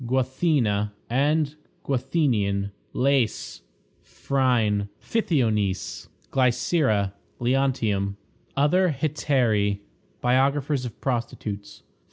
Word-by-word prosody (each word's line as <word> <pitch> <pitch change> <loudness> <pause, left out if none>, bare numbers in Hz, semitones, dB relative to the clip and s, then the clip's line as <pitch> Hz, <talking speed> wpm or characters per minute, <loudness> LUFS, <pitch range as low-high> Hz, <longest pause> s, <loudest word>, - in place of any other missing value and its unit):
Guathena 125 -5 +1 0.2
and 145 +3 +2 0.3
Guathenion. 120 -8 0 0.2
Lais. 130 -3 0 0.4
Phryne. 115 -7 0
Pythionice. 110 - 0 0.2
Glycera. 125 - +2 0.3
Leontium. 120 -6 +1 0.4
Other 160 +3 +3
Hetairæ. 120 -10 +1 0.4
Biographers 135 +2 +2
of 120 - -7
Prostitutes. 105 -5 -4
125 Hz, 65 wpm, -25 LUFS, 105-140 Hz, 0.4 s, Other